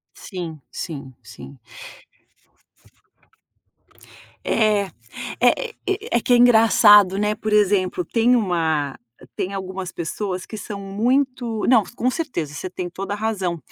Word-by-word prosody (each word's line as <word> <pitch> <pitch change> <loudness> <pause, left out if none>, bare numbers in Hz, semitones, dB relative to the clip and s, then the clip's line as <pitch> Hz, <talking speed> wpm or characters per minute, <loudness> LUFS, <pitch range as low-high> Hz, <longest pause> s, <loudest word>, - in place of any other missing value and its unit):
Sim, 170 -6 -7
sim, 140 -5 -7
sim. 115 +5 -12 2.9
É 215 -2 +2 0.6
é 485 - +2 0.2
é 410 - -1
é - - -3
que 245 - 0
é - - +7
engraçado, 220 -5 +6
né. 210 +1 +1
Por 215 0 -4
exemplo, 205 - +2
tem 235 -2 +2
uma 160 - 0 0.4
tem 190 - -3
algumas 190 -1 -5
pessoas 185 +2 -4
que 220 - -8
são 205 -1 -7
muito 235 +3 -1
não, 235 -4 +5
com 250 +1 0
certeza, 245 - -4
você 150 +6 -5
tem 180 0 -5
toda 195 +3 -5
a - - -5
razão. 200 -5 -2
205 Hz, 125 wpm, -22 LUFS, 180-230 Hz, 2.9 s, é